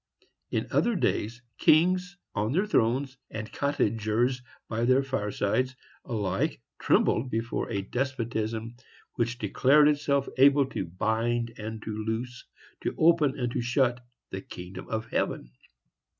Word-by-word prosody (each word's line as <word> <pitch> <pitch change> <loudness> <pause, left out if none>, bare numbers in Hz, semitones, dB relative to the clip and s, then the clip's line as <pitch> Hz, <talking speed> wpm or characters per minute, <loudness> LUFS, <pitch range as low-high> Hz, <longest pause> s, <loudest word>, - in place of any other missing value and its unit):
In - - -1
other 235 -1 +2
days, 120 - -1 0.2
kings 180 +2 +3 0.2
on 105 +4 0
their 190 +6 +2
thrones, 135 - +1
and 110 0 -6
cottagers 120 -2 0 0.3
by 115 +1 -2
their 130 +2 +4
firesides, 130 0 -1 0.3
alike 105 -7 -1 0.2
trembled 125 +3 +2
before 115 0 -2
a 100 -3 -2
despotism 115 -2 -3 0.4
which 120 +1 -1
declared 135 +7 +4
itself 145 -2 +1
able 140 +1 +6
to 95 - -2
bind 115 +6 -1
and 110 0 -6
to 110 - -4
loose, 110 +3 -4 0.4
to - - -2
open 160 -4 +4
and 125 -2 -1
to - - -1
shut 125 0 +1 0.3
the 95 - -4
kingdom 90 0 -9
of 110 0 -2
heaven. - - -1
120 Hz, 130 wpm, -28 LUFS, 110-135 Hz, 0.4 s, able